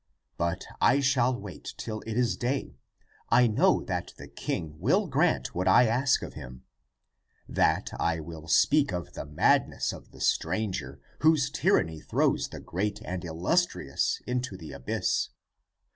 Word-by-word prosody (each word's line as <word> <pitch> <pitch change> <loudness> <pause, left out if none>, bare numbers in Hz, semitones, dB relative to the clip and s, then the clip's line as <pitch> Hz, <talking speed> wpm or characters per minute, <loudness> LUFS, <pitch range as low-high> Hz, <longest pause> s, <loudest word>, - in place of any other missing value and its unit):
But 85 +2 -2 0.2
I 125 +4 +5
shall 130 -2 +2
wait 100 -5 -8
till 110 -1 -5
it 110 0 -3
is 125 -2 +2
day. 120 - -3 0.5
I 125 - +6
know 110 -2 +3
that - - -4
the - - -10
king 75 -1 -4
will 170 - +2
grant 155 +2 +1
what 90 +2 -1
I 125 - +7
ask 125 +5 +2
of - - -7
him. 65 +1 -10 0.8
And 80 - +2
I 80 -1 +1
will 80 0 -9
speak 145 - +4
of 90 -1 -5
the - - -6
madness 75 - +2
of - - -11
the - - -16
stranger, 85 -7 -1 0.2
whose 150 -3 +3
tyranny 110 - +1
throws - - +1
the - - -9
great 105 +3 -3
and 90 0 -4
illustrious 85 - 0
into 125 -5 -2
the 80 -3 -9
abyss. 60 - -1
105 Hz, 150 wpm, -28 LUFS, 80-130 Hz, 0.8 s, I